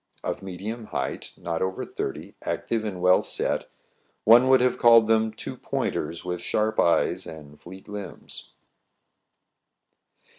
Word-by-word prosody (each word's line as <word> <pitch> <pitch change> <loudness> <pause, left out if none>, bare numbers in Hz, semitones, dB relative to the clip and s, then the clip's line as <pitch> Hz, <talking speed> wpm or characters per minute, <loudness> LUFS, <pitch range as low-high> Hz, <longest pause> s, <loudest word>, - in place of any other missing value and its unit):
Of - - -3
medium 100 +5 -6
height, 65 -9 -4
not 85 -1 -3
over 95 0 -2
thirty, - - -5
active, 115 -2 -2
and 95 -4 -4
well 90 0 +6
set, - - -1 0.5
one 120 +4 +7
would 130 0 +7
have 125 0 +1
called 115 -1 +7
them 110 0 +2
two 110 - -7
pointers 85 - -3
with 90 -1 -3
sharp 110 0 0
eyes 85 - +2
and 75 -2 -11
fleet 95 +2 -12
limbs. 105 -2 -7
105 Hz, 135 wpm, -26 LUFS, 90-115 Hz, 0.5 s, one